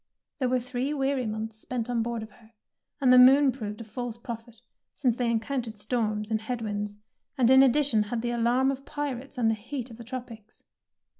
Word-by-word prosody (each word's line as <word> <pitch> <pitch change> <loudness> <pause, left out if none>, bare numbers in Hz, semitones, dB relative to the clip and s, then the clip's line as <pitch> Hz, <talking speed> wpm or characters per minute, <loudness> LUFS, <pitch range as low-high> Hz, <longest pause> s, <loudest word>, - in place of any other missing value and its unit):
There 255 -2 +1
were 255 0 +2
three 255 +4 -3
weary 270 -3 0
months 220 +1 -4
spent 240 0 -3
on 240 -2 0
board 230 -1 -3
of 220 - -11
her, 225 0 -21 0.5
and 255 -3 +5
the 250 - +9
moon 270 +2 +7
proved 215 -3 -6
a - - -5
false 235 +1 -5
prophet, 235 -1 -8 0.4
since 250 -5 +1
they 245 -1 0
encountered 230 -1 -2
storms 215 -1 -1
and 220 0 +1
head 245 +2 -3
winds, 205 -1 -3 0.4
and 250 -1 +4
in 265 0 +8
addition 270 -3 +4
had 225 +2 -3
the 240 - -1
alarm 240 +3 +2
of 275 0 -6
pirates 280 -2 -5
and 235 -2 +2
the 225 - +3
heat 240 +3 -6
of 225 - -11
the 235 - -9
tropics. 230 -3 -9
240 Hz, 205 wpm, -27 LUFS, 220-260 Hz, 0.5 s, the